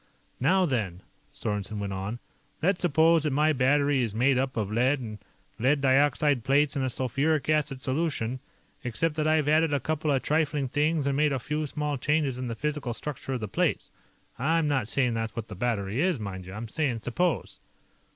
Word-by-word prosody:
"Now 185 +8 +3
then," 100 - -2 0.3
Sorensen 105 0 -3
went 100 -1 -3
on, 95 +4 -4 0.5
"let's 190 +2 +2
suppose 165 0 +4
that 150 - +1
my 155 +2 +3
battery 140 +1 +3
is 110 -4 -2
made 130 +4 +3
up 130 0 -1
of 105 -2 -1
lead 130 +6 +2
and 110 -4 -7 0.4
lead 135 +5 +3
dioxide 140 -1 +3
plates 140 +3 +2
in 140 - 0
a 130 - 0
sulfuric 135 +5 0
acid 150 -3 0
solution, 130 -4 -1 0.4
except 125 +7 -1
that 155 0 +1
I've 155 -2 +2
added 155 0 +3
a - - +1
couple 155 +2 -2
of 135 -2 +1
trifling 150 -3 0
things 150 +2 +1
and 140 -1 +1
made 150 +1 +3
a - - 0
few 150 +4 -3
small 150 -1 -3
changes 145 -3 0
in 130 - -3
the 115 - -3
physical 145 -2 -3
structure 135 -1 -5
of 125 - -3
the 105 - -3
plates. - - -1 0.5
I'm 160 +4 +2
not 135 -7 0
saying 125 0 +1
that's 115 -1 -3
what 115 -1 -5
the 105 - -7
battery 110 +2 -1
is, 180 -6 +1
mind 95 -3 -6
you; 95 - -8
I'm 115 +2 -5
saying 125 -2 -1
'suppose'." 165 +9 -1
135 Hz, 195 wpm, -27 LUFS, 115-150 Hz, 0.5 s, suppose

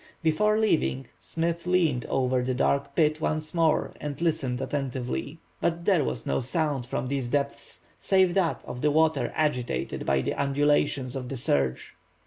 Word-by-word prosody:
Before 210 +7 +3
leaving, 160 -11 +1
Smith 170 +1 -3
leaned 165 -9 +2
over 130 -1 +1
the 125 0 -1
dark 140 +2 0
pit 155 -1 +2
once 155 0 -2
more 165 -2 +2
and 145 -1 -5
listened 155 -7 0
attentively. 135 +2 -3 0.2
But 170 0 -1
there 185 -7 +4
was 125 - -3
no - - 0
sound 135 0 -1
from 125 +1 -3
these 135 -2 -2
depths 140 +2 -3 0.2
save 190 -2 +3
that 180 -3 0
of 125 - -7
the 150 - +3
water 155 -4 +2
agitated 125 - -1
by 70 -1 +3
the - - -1
undulations 140 -2 +1
of 125 -2 -5
the 135 - -4
surge. 70 - -1
145 Hz, 160 wpm, -27 LUFS, 130-160 Hz, 0.2 s, there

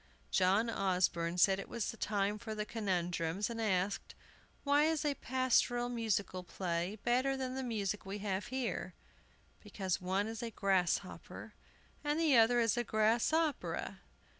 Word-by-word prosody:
John 195 +5 +3
Osborne 180 -5 0
said 190 +2 +4
it - - -7
was 235 -3 -2
time 205 0 0
for 220 0 -5
conundrums, 185 -2 -1
and 230 -1 -4
asked: 195 -2 -1 0.5
"Why 290 +1 +4
is 315 -1 0
a 290 - +2
pastoral 245 -2 +1
musical 220 -6 -1
play 175 +2 -3
better 260 +3 +2
than 260 -1 -3
the 265 - -3
music 210 -5 -2
we 195 +1 -5
have 200 -1 -2
here? 260 -2 -3 0.7
Because 190 -3 -3
one 190 +3 0
is 225 +2 -5
a 235 - -3
grasshopper, 195 -5 -1 0.5
and 295 +1 0
the 315 -5 +4
other 235 +1 +5
is 230 0 +2
a 240 - +1
grass 220 +3 +2
opera!" 320 -2 -1
215 Hz, 145 wpm, -34 LUFS, 190-245 Hz, 0.7 s, other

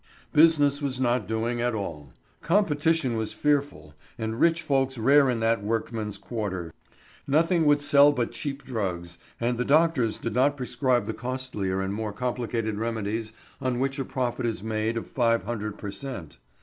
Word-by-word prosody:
Business 150 -2 +5
was 135 -3 -2
not 125 -1 +1
doing 115 +2 -1
at 120 -1 0
all. 75 -9 -5 0.3
Competition 165 - +2
was 110 -1 -2
fearful, 140 - -1 0.2
and 110 +1 -3
rich 165 0 +3
folks 135 -2 +1
rare 135 +4 +5
in 120 -3 -1
that 115 -1 +2
workmen's 110 -1 -2
quarter. 100 -6 -4 0.5
Nothing 165 +3 +3
would 145 0 +4
sell 145 0 +6
but 125 -5 -1
cheap 140 -1 -5
drugs, 90 -8 -4 0.2
and 120 0 -1
the - - +2
doctors 145 -6 +3
did 115 - -4
not 140 +4 +2
prescribe 125 -2 0
the - - -3
costlier 125 -7 -3
and 95 +1 -2
more 105 0 -3
complicated 115 -2 -2
remedies 110 -1 -2 0.3
on 130 -1 0
which 135 +2 -1
a - - 0
profit 125 -1 -2
is 110 -4 -3
made 110 +1 -1
of 115 - -3
five 115 -2 +1
hundred 105 -3 -4
per 105 - -6
cent. 100 - -8
120 Hz, 165 wpm, -26 LUFS, 110-140 Hz, 0.5 s, sell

